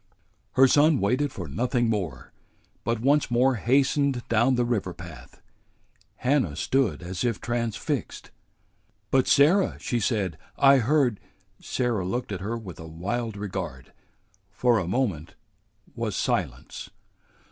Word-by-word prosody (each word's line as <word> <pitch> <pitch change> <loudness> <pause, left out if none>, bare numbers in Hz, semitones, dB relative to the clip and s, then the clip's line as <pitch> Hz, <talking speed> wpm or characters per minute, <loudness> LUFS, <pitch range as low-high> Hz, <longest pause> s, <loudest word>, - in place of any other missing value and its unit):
Her 135 +1 +6
son 145 +1 +4
waited 130 +8 +1
for 90 -4 -6
nothing 120 - 0
more, 90 - -3 0.5
but 115 0 -1
once 145 +4 +3
more 125 +1 +3
hastened 135 +2 +1
down 120 +3 +3
the 120 0 +1
river 105 -7 -2
path. 85 -3 -12 0.7
Hannah 125 - +1
stood 125 - 0
as 90 +3 -4
if 120 -3 0
transfixed. 120 -2 -3 0.8
"But, 130 -1 +3
Sarah," 175 +7 +4
she 120 - -1
said, 100 -7 -1 0.2
"I 140 0 +6
heard 125 -3 +2 0.2
" 95 0 -41
Sarah 120 -6 -1
looked 115 +6 -3
at 95 - -4
her 110 +5 -3
with 100 -7 -9
a 80 - -8
wild 100 +7 -4
regard. 80 -10 -6 0.6
For 120 +3 +2
a 90 - -3
moment 95 - -2 0.6
was 115 -4 -3
silence. - - -2
115 Hz, 135 wpm, -26 LUFS, 95-130 Hz, 0.8 s, Her